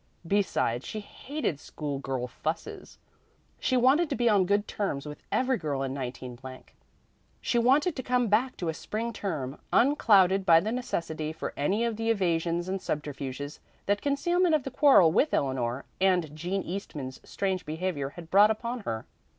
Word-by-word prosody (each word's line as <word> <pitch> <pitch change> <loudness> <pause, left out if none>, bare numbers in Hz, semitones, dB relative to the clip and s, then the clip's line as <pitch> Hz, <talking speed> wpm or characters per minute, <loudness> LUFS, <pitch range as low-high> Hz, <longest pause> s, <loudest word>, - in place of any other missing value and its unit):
Besides, 165 - +1
she 215 - -5
hated 235 - -4
"schoolgirl 135 -5 -4
fusses." 160 +6 -5 0.6
She 255 - +1
wanted 275 +7 +4
to 280 - -1
be 240 -2 +1
on 200 -5 +4
good 205 +1 +1
terms 155 -9 -2
with 150 0 -8
every 260 -2 +1
girl 145 -4 -2
in 135 -1 -3
19. 125 -2 -6 1.0
She 240 - +1
wanted 280 +8 +3
to 260 - -3
come 250 -1 +1
back 230 +5 +1
to 175 - -2
a - - -1
spring 225 +7 -4
term 150 -10 -4
unclouded 195 -8 +4
by 165 -3 +7
the 215 +6 -2
necessity 165 -10 -3
for 160 - -5
any 195 +11 +1
of 230 -2 -2
the 225 0 -1
evasions 175 -4 +1
and 190 0 -2
subterfuges 145 -1 -4 0.3
that 205 0 +1
concealment 340 +4 +2
of 300 - 0
the 270 - -5
quarrel 265 - +6
with 290 - +2
Eleanor 130 -2 -1
and 180 -5 +2
Jean 180 +5 -2
Eastman's 150 -8 -6
strange 190 -2 -2
behavior 155 -2 -3
had 165 +2 -12
brought 205 +2 +7
upon 235 +3 -2
her. 115 - -4
190 Hz, 165 wpm, -28 LUFS, 150-235 Hz, 1.0 s, by